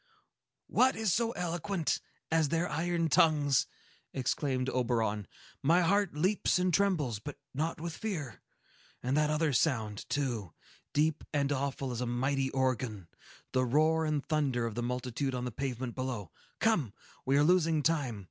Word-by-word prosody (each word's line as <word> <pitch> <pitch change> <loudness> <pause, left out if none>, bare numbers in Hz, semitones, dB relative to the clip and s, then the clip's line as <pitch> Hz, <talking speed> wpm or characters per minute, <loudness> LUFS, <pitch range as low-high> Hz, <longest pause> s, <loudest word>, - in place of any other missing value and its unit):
"What 260 +1 +3
is 220 -5 +1
so 230 0 +2
eloquent 175 0 -1 0.3
as 160 -2 +3
their 165 +3 +1
iron 165 +2 0
tongues!" 145 -4 +4 0.5
exclaimed 130 0 -1
Oberon. 115 -6 0 0.3
"My 165 +6 +4
heart 195 0 +2
leaps 185 +7 +2
and 180 -1 +1
trembles, 155 - +1
but 145 +7 -7 0.2
not 155 +4 -2
with 165 0 -4
fear. 160 - -4 0.6
And 130 +3 0
that 150 0 +3
other 150 -1 +1
sound, 110 -7 0
too,—deep 140 - -2
and 145 -1 +1
awful 135 -1 -2
as 120 0 -3
a 125 - -1
mighty 135 +3 0
organ,—the 130 -2 -2
roar 155 +5 +3
and 150 -2 -1
thunder 140 -6 0
of 115 - -3
the 120 - -3
multitude 125 +2 -2
on 125 0 -3
the 125 - -3
pavement 125 0 -3
below! 125 - -4 0.3
Come! 165 - +2 0.3
We 135 +1 +2
are 145 - +5
losing 165 -2 +3
time. 140 -9 0
140 Hz, 150 wpm, -31 LUFS, 125-165 Hz, 0.6 s, are